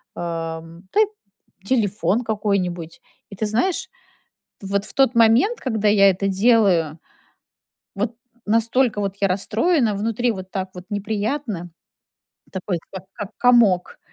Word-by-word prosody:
эм, 165 +1 -6
та 425 - +2
й - - +5 0.6
телефон 220 -1 +1
какой-нибудь. 195 -6 -2 0.3
И 200 - -9
ты 215 - -2
знаешь, 370 - 0 0.7
вот 200 +1 -1
в - - -10
тот 270 -3 +3
момент, 235 - +4
когда 220 -5 0
я 200 -1 +6
это 195 +2 -1
делаю, 190 -7 +3 1.0
вот 215 +3 -2 0.3
настолько 230 +1 +2
вот 195 -1 -2
я 195 - +4
расстроена 220 - +1
внутри, 230 +3 0
вот 190 -2 -8
так 190 -1 -3
вот 180 - -8
неприятно, 205 - -3 0.8
такой 185 -1 -3
как 190 -1 -7
как 205 - -6
комок. 230 -8 +3
205 Hz, 125 wpm, -22 LUFS, 185-230 Hz, 1.0 s, я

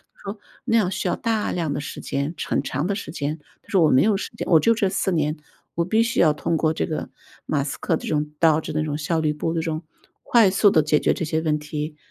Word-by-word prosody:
“他 - - -29
说：” 210 - -11 0.2
那 230 - +2
样 205 -5 +2
需 190 - -2
要 - - +1
大 225 -2 -1
量 165 -5 -1
的 145 - -3
时 145 - -7
间， 140 +3 -2
陈 - - -1
很 - - 0
长 145 +6 -2
的 200 - 0
时 200 - -6
间。 150 0 -3 0.2
“他 - - -32
说： 190 - +3
“我 155 - +4
没 130 - +5
有 210 0 +3
时 195 - -4
间， - - -4
我 165 - +7
就 230 - +4
这 210 -3 +1
4 190 0 0
年， 155 -3 0 0.4
我 170 - +1
必 220 +5 +2
须 230 +1 +1
要 155 - +5
通 165 +2 -1
过 155 0 +1
这 - - -1
个 155 - -4 0.4
马 145 - 0
斯 140 0 -4
克 165 - 0
这 - - -8
种 150 -1 -1
DOGE 160 -2 +3
那 155 0 0
种 150 -1 -2
效 160 +2 -1
率 155 -1 +1
部， 155 +2 -2
这 165 - 0
种 160 0 -3 0.4
快 230 -5 +5
速 200 +2 +4
地 155 - +5
解 150 0 +2
决 - - +2
这 165 - -3
些 160 +1 -1
问 155 -2 0
题。” 150 0 -5
160 Hz, 300 characters per minute, -23 LUFS, 150-190 Hz, 0.4 s, 我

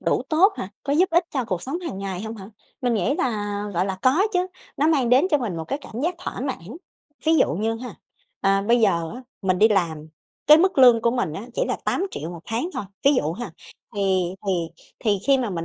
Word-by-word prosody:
Đủ - - +1
tốt 360 +7 +4
hả? 185 - -5
Có 280 - -1
giúp 355 +6 +4
ích 340 +1 +3
cho 265 -4 -1
cuộc 185 -6 -3
sống 280 +6 -3
hàng 335 - -5
ngày 195 -1 -4
hông 220 +1 -6
hả? 195 0 -10 0.3
Mình 245 -2 +1
nghĩ 220 +6 +1
là, 205 - -1
gọi 180 +2 +1
là, 190 -1 -3
có 275 +9 +4
chứ 360 -1 +1 0.3
nó 295 - +2
mang 275 -7 +2
đến 260 +8 +5
cho 295 - +4
mình 215 -9 -3
một 160 - -4
cái 275 - -3
cảm 230 - -7
giác 345 +3 0
thỏa - - -6
mãn. 250 - -5 0.5
Ví 320 +1 +4
dụ - - +3
như 220 +5 -1
ha, 245 +2 -7 0.5
à, 195 0 +2
bây 235 +4 +3
giờ 170 -7 +2
á 250 - -9 0.2
mình 185 -1 +1
đi 220 - +6
làm 165 -7 0 0.4
cái 300 - +9
mức 375 -3 +2
lương 245 -3 +7
của 235 - +3
mình 235 -10 -1
á 200 +8 -6
chỉ - - 0
là - - 0
8.000.000 355 - -2
1 170 -2 -8
tháng 235 +10 -2
thôi, - - -3 0.2
ví 280 +1 +6
dụ 160 - 0
ha, 240 +7 -6 0.4
thì 190 -3 0
thì 195 - +2 0.5
thì 205 -3 +2
khi 275 -1 +5
mà 240 -4 -1
mình 165 -3 -3
225 Hz, 240 wpm, -23 LUFS, 190-275 Hz, 0.5 s, cái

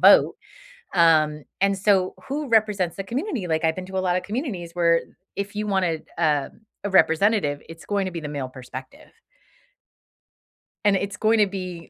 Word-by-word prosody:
vote, - - +6 0.6
um, 155 -3 +4 0.2
and, 195 0 +3
so, 190 -2 +2
who 290 +1 -3
represents 210 -6 +2
the 195 - -4
community? 240 - -3
Like, 160 0 0
I've 160 0 +2
been 185 0 -6
to 190 0 -4
a - - +2
lot 180 0 +2
of - - -3
communities 205 - -4
where 170 -1 +4
i - - -23 0.2
if 200 +1 -4
you 210 0 -2
wanted, 180 -5 0
uh, 150 -4 +1 0.3
a 205 - -1
representative, 175 -4 +3
it's 165 0 -11
going 200 -2 0
to 185 - -3
be 170 - -4
the 150 - -6
male 140 -3 -4
perspective 130 - -10 1.8
and 205 - +5
it's 200 +1 -2
going 220 +1 +3
to 210 - +5
be 185 -3 -6
185 Hz, 180 wpm, -24 LUFS, 165-205 Hz, 1.8 s, vote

